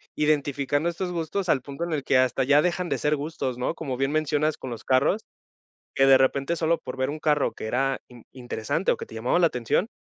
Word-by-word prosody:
identificando 145 0 +1
estos 180 +1 -4
gustos 175 +3 -2
al 135 - +2
punto 140 +5 -5
en 170 - -4
el 145 -3 -1
que 135 - +3
hasta 130 +1 +2
ya 145 +3 +5
dejan 180 +1 -1
de - - 0
ser 150 +1 +1
gustos, 145 -4 -4
¿no? 125 - -1
Como 145 -6 -4
bien 135 +2 0
mencionas 155 0 0
con 130 - -7
los 120 -2 -7
carros, 140 +11 +2 0.7
que 135 - +4
de 135 -1 +7
repente 135 +5 +1
solo 165 +1 +2
por 125 - -8
ver 130 +1 0
un 155 +2 -5
carro 150 -2 +1
que - - -6
era 135 +3 0
in 120 -2 -15
interesante 125 - -2
o - - 0
que - - -7
te - - -12
llamaba 120 +9 +1
la 170 - +5
atención, 125 - 0
145 Hz, 235 wpm, -25 LUFS, 130-160 Hz, 0.7 s, de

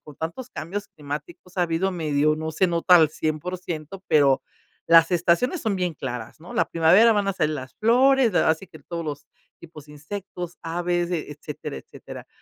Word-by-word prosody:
con 150 -2 -13
tantos 200 +11 -6
cambios 200 +6 -5
climáticos 150 +5 -8
ha 180 - +4
habido 175 +3 0
medio, 155 -2 +1
no 160 0 -4
se 175 +4 +2
nota 175 +1 +5
al 160 -3 +5
100 165 +2 -4
pero 140 -3 +4 0.5
las 165 +1 +6
estaciones 175 - +2
son 215 -4 0
bien 180 -3 -1
claras, 125 -2 -6
¿no? 175 - -11
La - - +1
primavera 185 +8 +5
van 205 -2 0
a - - +1
salir 155 -5 0
las 130 -3 -8
flores, 250 +2 +4
da 175 - +3
así 160 +4 -2
que 155 - -15
todos 170 +3 -6
los 145 -1 -6 0.3
tipos 155 -3 -12
de 150 - -14
insectos, 175 +3 -7
aves, 175 +1 -1
eh, 165 - -2
etcétera, 150 0 -7
etcétera. - - -11
170 Hz, 185 wpm, -24 LUFS, 155-185 Hz, 0.5 s, las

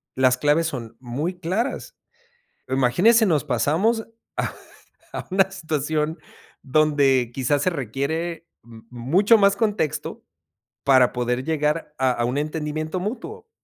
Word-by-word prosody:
las 130 -1 +3
claves 150 +4 +2
son 115 -6 -6
muy 145 +9 -4
claras. 195 +11 -3 0.7
Imagínese, 155 - +4
nos 160 -7 +2
pasamos 165 - +1 0.3
a - - -1 0.6
a - - -6
una 190 0 +3
situación 155 -3 -2 0.4
donde 140 -4 +2
quizás, 135 +2 0
se 185 - +2
requiere 160 +6 -3 0.2
m 115 -1 -14
mucho 175 - +3
más 200 0 +4
contexto, 205 -7 -2 0.6
para 130 -3 +5
poder 125 +1 -1
llegar 150 -1 -1
a 130 -1 +2
a 120 -1 -1
un 125 +3 -1
entendimiento 155 +2 -3
mutuo. 265 - -6
150 Hz, 125 wpm, -23 LUFS, 130-180 Hz, 0.7 s, para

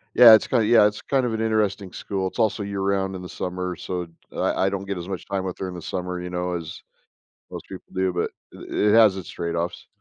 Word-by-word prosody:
Yeah, 120 -2 +10
it's 110 - +5
kinda 115 -4 +2
yeah, 110 -1 +6
it's 105 0 -4
kind 135 -2 +1
of 120 - -1
an 110 - -2
interesting 105 -3 0
school, 95 0 -3
it's 95 - -8
also 110 -2 +1
year-round 100 -1 -1
in 90 - -6
the 90 - -8
summer, 90 0 -4
so 90 -1 -4 0.3
I - - 0
I - - +3
don't 100 0 -4
get 100 -1 -3
as 85 0 -6
much 95 -2 -5
time 100 -1 -2
with 95 -1 -4
her 95 - -3
in 90 - -6
the 90 - -7
summer, 90 +2 -4
you 90 - -5
know, 90 0 -2
as 85 -2 -6 0.7
most - - -7
people - - -9
do, 95 -1 0
but, 90 - -1 0.3
i - - -10
it 105 0 +2
has 110 -4 +6
its 95 - -7
trade-offs. 85 +1 -3
95 Hz, 245 wpm, -24 LUFS, 90-105 Hz, 0.7 s, Yeah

